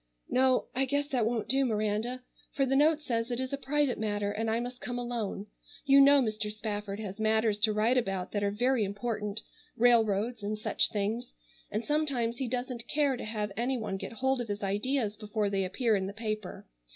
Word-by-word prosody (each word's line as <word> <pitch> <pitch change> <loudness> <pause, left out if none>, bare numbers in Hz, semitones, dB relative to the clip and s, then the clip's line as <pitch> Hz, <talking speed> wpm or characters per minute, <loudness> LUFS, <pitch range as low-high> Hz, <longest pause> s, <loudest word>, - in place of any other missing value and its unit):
"No, 255 0 +3
I 265 +2 +1
guess 285 +2 0
that 245 -6 +1
won't 230 -2 -1
do, 270 +1 +3
Miranda, 220 +2 -1 0.3
for 275 - +2
the 270 +1 +1
note 305 +2 +4
says 230 -3 -1
it 240 0 -1
is 260 +1 -3
a - - +3
private 285 -2 0
matter 205 -1 -1
and 220 +2 -2
I 225 +1 +1
must 245 +1 -6
come 245 0 -4
alone. 235 -5 -3 0.4
You 275 0 +7
know 280 0 +7
Mr. 215 -2 -2
Spafford 210 -1 -4
has 205 -1 -6
matters 220 -1 +2
to 215 0 +4
write 220 +4 +3
about 195 -5 -3
that 205 -1 -1
are 200 - +2
very 245 +3 +1
important, 210 +1 -3 0.3
railroads, 225 -1 +3
and 210 +1 -2
such 215 - +2
things, 220 +4 -2 0.3
and 215 +3 -3
sometimes 275 -6 0
he 265 - -2
doesn't 245 -1 -4
care 285 -3 +2
to 245 - -6
have 210 -1 -3
any 250 +4 0
one 215 -4 -3
get 210 - -6
hold 265 +3 0
of 240 - -5
his 205 0 -4
ideas 210 +3 0
before 210 -1 -2
they 195 -1 +1
appear 220 +4 +1
in 190 -1 -1
the 200 - -6
paper. 215 -3 -4
225 Hz, 205 wpm, -30 LUFS, 210-255 Hz, 0.4 s, You